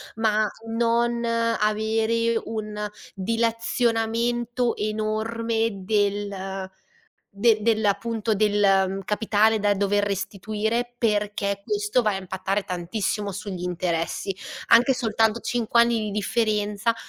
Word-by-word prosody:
ma 215 -1 +2 0.2
non 235 +1 +1
avere 225 0 +1
un 210 -1 -4 0.2
dilazionamento 230 +2 0
enorme 220 +2 -1
del 200 -2 -1 0.6
de 215 +2 +3
del 220 0 +2
appunto 220 +2 0
del 195 -2 +2
capitale 215 +1 +2
da 205 0 +2
dover 205 +1 +1
restituire 215 +4 -2
perché 205 -3 0
questo 415 - +1
va 215 -2 +1
a 195 - -2
impattare 190 +1 -2
tantissimo 195 +3 -2
sugli 190 -2 -6
interessi. 180 +1 -2 0.3
Anche 245 +4 +6
soltanto 225 -1 +1
5 235 -1 0
anni 235 -1 +2
di 215 -1 -3
differenza 210 +1 0
215 Hz, 100 wpm, -24 LUFS, 205-230 Hz, 0.6 s, Anche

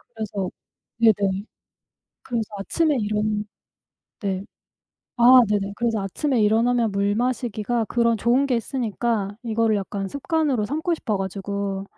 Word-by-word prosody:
그래서 205 -4 -3 0.5
네네 200 -3 +3 0.8
그래서 235 -3 -1 0.2
아침에 305 - +1
이런 210 0 -1 0.8
네. 195 -2 -2 0.7
아 250 +2 +8
네네. 200 -1 -1
그래서 230 -3 0
아침에 235 - -1
일어나면 230 +2 +3
물 200 +1 +1
마시기가 240 -1 -1
그런 235 -1 +2
좋은 240 +6 +2
게 255 -3 +1
있으니까 225 -3 -2
이거를 225 -2 +1
약간 195 0 -3
습관으로 285 - 0
삼고 315 - -1
싶어 220 -9 -2
가지고 195 0 -3
220 Hz, 285 characters per minute, -23 LUFS, 200-245 Hz, 0.8 s, 아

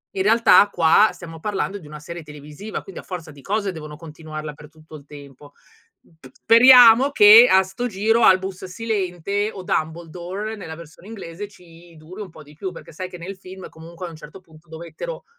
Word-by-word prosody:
in 190 - -1
realtà 225 -1 +5
qua 175 +6 +4
stiamo 165 -2 -11
parlando 200 +1 -3
di 155 - -15
una 150 0 -10
serie 170 +2 -9
televisiva, 150 +7 -9
quindi 195 - -10
a - - -23
forza 175 -4 -8
di 140 -1 -16
cose 200 +1 -2
devono 155 -3 -10
continuarla 155 -1 -9
per 150 +1 -15
tutto 155 0 -16
il 145 -1 -13
tempo. 145 0 -14 0.7
P 130 - -15
speriamo 245 - +6
che 220 0 +8
a 190 0 +5
'sto 190 +6 -5
giro 225 +3 0
Albus 190 0 +2
Silente, 200 -1 -3
o 190 - -10
Dumbledore 175 +6 -4
nella 160 -6 -9
versione 170 +3 -15
inglese, 200 -2 -8
ci 170 -2 -19
duri 180 +7 -11
un 195 - -8
po' 160 -1 -15
di 150 +1 -18
più, 185 +4 -6
perché 165 - -13
sai 185 +3 -7
che 180 - -10
nel 185 +3 -8
film 185 0 -11
comunque 170 +3 -11
a - - -8
un - - -12
certo 155 +3 -13
punto 160 -1 -21
dovettero 170 - -9
180 Hz, 195 wpm, -21 LUFS, 160-205 Hz, 0.7 s, che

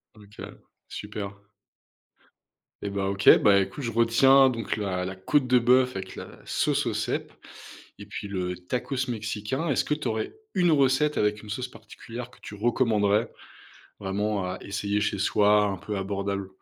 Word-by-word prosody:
OK, 105 0 -12 0.3
super. 100 -1 -7 1.4
Et 100 - -3
ben 100 0 -2
OK, 100 0 -3
ben 100 -1 +5
écoute, 145 +8 -8
je 115 - -2
retiens 130 +4 +5
donc 115 -2 -3
la 95 -3 -2
la 95 +1 -4
côte 130 +8 +1
de 125 0 +5
bœuf 125 +1 +3
avec 95 0 -6
la - - -7 0.2
sauce - - 0
aux - - -1
cèpes - - -3 0.7
et 100 - -10
puis 105 0 -6
le 90 -2 -3
tacos 125 +9 -4
mexicain. 110 +7 -3
Est-ce 140 - +2
que 150 - 0
tu 150 - -3
aurais 110 - -3 0.2
une 175 -2 +3
recette 140 +1 +3
avec 105 0 0
une 105 - -11
sauce 125 +4 -3
particulière 120 +1 -10
que - - -20
tu 105 - -9
recommanderais 110 -1 +1 0.7
vraiment 100 +1 -1
à 90 0 -4
essayer 100 +1 -2
chez 100 -1 -1
soi? 105 +1 +4
Un 100 -2 -2
peu 105 +3 -5
abordable. 100 0 -3
105 Hz, 165 wpm, -26 LUFS, 100-125 Hz, 1.4 s, ben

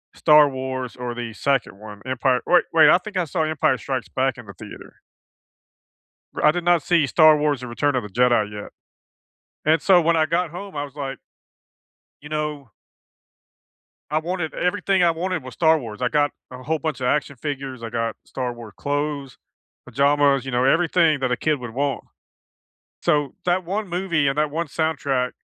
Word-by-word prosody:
Star 150 -1 +6
Wars 130 -2 -5
or 125 -1 -5
the 120 -2 -6
2nd 135 -4 -1
one, 105 0 -11
Empire 130 0 +1
wait 180 - +5
wait, 155 -2 +7
I - - +7
think 200 +1 -7
I 180 - +1
saw 160 +1 -1
Empire 155 0 +1
Strikes - - -4
Back - - -1
in - - -11
the - - -11
theater. - - -12 1.4
R - - -4
I 150 - +7
did 175 +2 -3
not 175 -2 +3
see 170 -3 +2
Star 155 +2 +6
Wars 145 -3 0
and 125 - -6
Return 145 +4 0
of 125 - 0
the 105 - -8
Jedi 120 -1 +2
yet, 105 0 -8 0.9
and 155 0 +3
so 180 -3 +5
when 165 +1 +2
I 155 - +3
got 170 0 -1
home, 195 +1 -8
I 145 - -2
was 140 -1 -10
like 135 -2 -5 1.0
you 150 - -10
know 150 -4 -4 1.4
I 155 - +1
wanted 165 -1 -4
everything 185 +1 0
I 170 - +5
wanted 175 0 -3
was 130 0 -10
Star 160 -1 +4
Wars. 115 -4 -8
I 125 - +2
got 145 +1 +1 0.2
a 125 0 -10
whole 160 +4 -1
bunch 155 -1 -4
of 125 - -1
action 140 +1 0
figures, 135 -2 -5
I 115 - -5
got 115 -1 -2
Star 125 -2 -4
War 115 -4 -11
clothes, 145 -1 -3 0.5
pajamas, 140 +1 +2
you 135 - -5
know, 125 0 +1
everything 165 0 +3
that 130 -1 0
a - - +1
kid 155 +2 0
would 120 -3 -8
want. 140 0 -2 1.0
So 145 -2 +1
that 180 +1 +1
one 200 +4 -3
movie 175 -4 0
and 135 +2 -2
that 150 -1 +1
one 165 +3 -2
soundtrack 140 -5 -1
145 Hz, 190 wpm, -22 LUFS, 130-160 Hz, 1.4 s, wait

